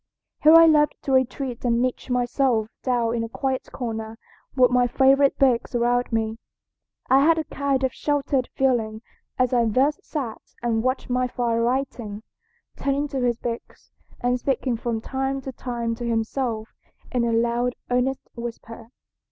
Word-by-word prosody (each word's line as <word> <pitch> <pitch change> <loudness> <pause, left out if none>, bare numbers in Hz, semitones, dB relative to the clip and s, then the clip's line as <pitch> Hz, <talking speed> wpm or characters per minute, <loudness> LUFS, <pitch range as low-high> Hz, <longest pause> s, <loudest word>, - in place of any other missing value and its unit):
Here 310 +2 +8
I 330 0 +9
loved 300 -2 +4
to 275 - -2
retreat 260 -1 0
and 235 -1 +2
niche 255 +1 -2
myself 245 -2 +1
down 240 -3 0
in 230 -1 -1
a 230 - -5
quiet 265 +2 -2
corner 225 -3 -5 0.4
with 255 -2 +5
my 250 0 +3
favorite 270 +2 +4
books 250 -3 +2
around 245 +1 +1
me. 225 0 -1 0.7
I 270 +1 +5
had 325 +2 +4
a 320 - 0
kind 280 -3 -1
of 260 - 0
sheltered 280 -3 0
feeling 230 -4 0 0.3
as 255 0 +1
I 240 -2 +3
thus 265 +7 +2
sat 260 -8 -5 0.2
and 230 -2 +1
watched 255 +1 -1
my 250 0 +1
father 235 -2 -1
writing, 235 -4 -2 0.5
turning 280 +1 -1
to 270 -2 -2
his 240 -2 +1
books, 235 -1 -7 0.3
and 245 0 +1
speaking 260 -1 0
from 225 -1 -3
time 270 +2 -2
to 265 - -6
time 235 -2 -3
to 235 +1 -6
himself 225 0 -2 0.4
in 245 -2 +1
a 235 - +1
loud, 235 +2 +1 0.2
earnest 250 +2 0
whisper. 230 -1 -8
245 Hz, 160 wpm, -24 LUFS, 230-270 Hz, 0.7 s, I